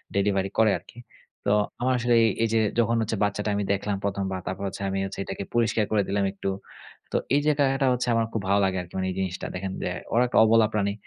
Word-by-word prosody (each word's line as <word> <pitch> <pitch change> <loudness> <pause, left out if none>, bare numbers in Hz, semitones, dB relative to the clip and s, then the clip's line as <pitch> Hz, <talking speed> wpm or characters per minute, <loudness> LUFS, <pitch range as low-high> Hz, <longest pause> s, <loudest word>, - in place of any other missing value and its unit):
Delivery 100 -1 +1
করে 110 -2 +5
আরকি। 100 +6 -16 0.5
তো - - +3 0.3
আমার 130 +1 +2
আসলে 120 0 +1
এই, 110 - +4
এই 115 - +1
যে 110 - +4 0.2
যখন 115 0 +2
হচ্ছে 110 -1 -2
বাচ্চাটা 105 +1 -1
আমি 100 - 0
দেখলাম 100 0 -2
১ম 100 -1 -1
বার, 95 - -3
তারপর 95 +2 -4
হচ্ছে 100 - -7
আমি 95 - -1
হচ্ছে 95 - -7
এটাকে 95 +1 -5
পরিষ্কার 115 -2 +2
করে 105 -2 +3
দিলাম 100 0 0
একটু। 95 0 -4 0.6
তো - - +1 0.2
এই - - +5
যে - - +4
এটা, 145 - +2
এটা 135 -1 +1
হচ্ছে 125 0 -2
আমার 115 0 +2
খুব 110 - -1
ভালো 100 +1 +4
লাগে 95 0 0
আরকি 85 - -12
মানে 95 0 -1
এই 90 - -6
জিনিসটা। 95 -1 -3
দেখেন 95 +1 -4
যে, - - -1 0.2
ওরা 120 +2 +4
একটা 125 - -1
অবলা 110 0 +5
প্রাণী। 100 -1 0
100 Hz, 245 wpm, -25 LUFS, 95-115 Hz, 0.6 s, করে